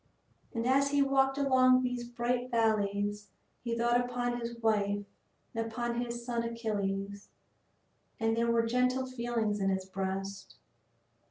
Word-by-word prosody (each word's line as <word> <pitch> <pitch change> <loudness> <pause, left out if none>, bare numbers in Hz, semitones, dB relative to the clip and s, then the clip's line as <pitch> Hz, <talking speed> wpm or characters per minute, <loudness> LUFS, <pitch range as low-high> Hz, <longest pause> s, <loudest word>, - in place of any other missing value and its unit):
And 230 0 -2
as 275 +2 +3
he 285 0 +3
walked 270 0 +2
along 255 -2 +5
these 250 -1 -2
bright 245 +1 -1
valleys 205 -3 +1 0.4
he 235 -1 -2
thought 240 +1 +3
upon 245 0 -2
his 235 0 -4
wife 205 -3 +1 0.5
and 225 0 -2
upon 240 +1 -2
his 235 -1 -5
son 235 -1 -1
Achilles, 200 -4 -3 0.9
and 225 -1 +1
there 235 0 +1
were 230 0 +3
gentle 250 +2 +1
feelings 235 -4 -1
in 195 0 +1
his 190 -1 -1
breast. 195 +1 -4
235 Hz, 140 wpm, -31 LUFS, 205-245 Hz, 0.9 s, along